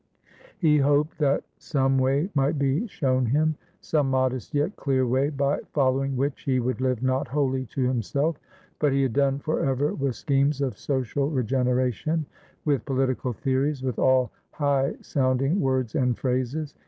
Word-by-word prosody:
He 155 -6 +3
hoped 145 +3 +2
that 140 -2 +2 0.2
some 135 -2 +1
way 140 +8 +1
might 145 +2 +1
be 140 - 0
shown 130 - 0
him, 155 +6 +2 0.3
some 150 -4 0
modest 130 -3 0
yet 145 +8 0
clear 130 -2 +1
way, 130 +4 +1
by 140 -1 0
following 135 -1 +1
which 140 +2 -1
he 130 -2 +1
would 125 +1 -2
live 130 -2 0
not 130 +2 +1
wholly 130 -2 -1
to 130 +4 -2
himself; 140 +5 0 0.4
but 145 -3 +2
he 135 0 +2
had 130 -4 0
done 140 0 +2
for 155 +2 -2
ever 135 +2 +1
with 135 -3 -2
schemes 140 0 +1
of 135 -3 -1
social 140 +1 -1
regeneration, 130 +3 0 0.4
with 140 -6 +1
political 130 -2 -1
theories, 135 +3 -1
with 130 -3 -2
all 130 -3 +3 0.2
high 140 -1 0
sounding 135 +5 +1
words 130 -3 0
and 125 -6 +1
phrases. 130 +4 -2
135 Hz, 160 wpm, -25 LUFS, 130-145 Hz, 0.4 s, He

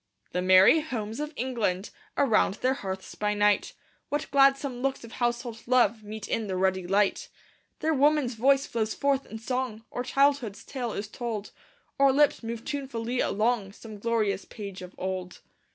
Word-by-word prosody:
The 180 - -1
merry 185 - +7
homes 230 -7 -4
of 300 0 -3
England! 225 -6 -1 0.3
Around 225 -7 +3
their 255 +4 +1
hearths 190 -7 -6
by 210 0 -1
night, 205 0 +2 0.4
What 290 +1 -2
gladsome 275 -2 +3
looks 270 -1 -1
of 230 - -10
household 240 -1 -2
love 235 -3 +3
Meet 210 0 -7
in 220 -2 -1
the 190 - -2
ruddy 190 -1 +1
light! 195 +1 +1 0.5
There 320 +1 +2
woman's 290 -2 +3
voice 270 +5 +3
flows 220 -2 -2
forth 275 -1 0
in 220 - -7
song, 230 -1 -3
Or 245 - -3
childhood's 270 -5 +1
tale 245 -5 -4
is 205 - -4
told; 220 -2 -5 0.5
Or 275 -1 +6
lips 290 +2 +3
move 230 0 -6
tunefully 255 -4 -3
along 215 -2 0
Some 215 -1 -11
glorious 215 -3 0
page 200 -3 -8
of 180 0 -10
old. 185 -1 -4
230 Hz, 165 wpm, -27 LUFS, 205-265 Hz, 0.5 s, merry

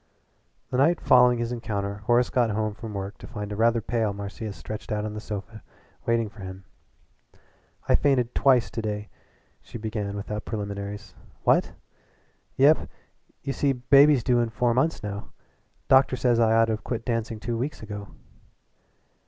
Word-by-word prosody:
The 125 - 0
night 160 +6 +4
following 125 -1 +5
this 120 0 -2
encounter 100 -4 -3
Horace 120 +1 +3
got 120 -2 +2
home 110 0 -1
from 105 0 -8
work 100 +1 -5
to - - -10
find 105 -4 -6
a - - -3
rather 115 +2 +3
pale 110 -1 -1
Marcia 100 +2 -6
stretched 105 +2 -8
out 105 0 -1
on 105 - -4
the 105 - -5
sofa 105 +1 -7 0.5
waiting 115 -1 +2
for 105 +1 -15
him. 95 0 -8 1.2
"I - - +4
fainted 130 -4 +2
twice 130 -4 +3
to 115 - -3
day," 105 -1 -4 0.5
she - - -9
began 105 -2 -4
without 105 +1 -5
preliminaries. 100 -1 -5 0.3
"What?" - - +3 0.8
"Yep. 145 +4 +4 0.5
You 140 - -2
see 140 0 +1
baby's 140 +1 +5
due 125 -1 +3
in 120 -1 +1
four 120 +1 +1
months 130 +4 0
now. 100 0 -5 0.6
Doctor 130 -1 +5
says 125 -2 +2
I 110 -1 +4
ought 115 0 +5
to 115 - -2
have 110 - -5
quit 115 -2 -4
dancing 115 -2 -2
two 115 +2 -3
weeks 135 -1 -4
ago." 105 -1 -7
115 Hz, 170 wpm, -26 LUFS, 105-125 Hz, 1.2 s, following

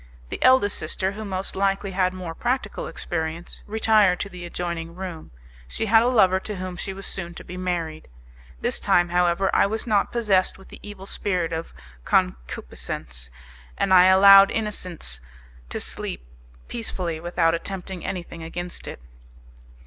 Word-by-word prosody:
The - - -5
eldest 255 -6 +4
sister, 185 +4 -2
who 215 +2 -7
most 190 -2 -2
likely 195 0 0
had 185 -1 +1
more 180 -3 -6
practical 240 +2 -2
experience, 165 0 -4
retired 215 -3 +4
to 200 - -3
the 180 -2 -8
adjoining 170 -1 -4
room; 180 -4 -7 0.4
she 220 - -2
had 225 +1 +6
a 235 - +2
lover 190 -7 +4
to 210 +2 -6
whom 185 -1 -5
she 195 - -4
was 195 +1 -8
soon 175 -3 -5
to - - -9
be 180 - -9
married. 175 -4 -3 0.5
This - - 0
time, 175 0 +3
however, 175 +2 +2
I - - +5
was 220 +2 -3
not 210 -4 +2
possessed 205 -6 +2
with 190 - -16
the - - -11
evil 205 -2 -9
spirit 180 -5 -1
of 165 +1 -4 0.3
concupiscence, - - -2 0.5
and 190 - +2
I 180 -1 +8
allowed 195 +1 +9
innocence 180 - -3 0.5
to - - -4
sleep - - -5 0.4
peacefully 180 -8 -3
without 170 -1 +1
attempting 185 +1 -5
anything 170 -2 -5
against 175 +2 -6
it. - - -7
185 Hz, 155 wpm, -24 LUFS, 170-200 Hz, 0.5 s, allowed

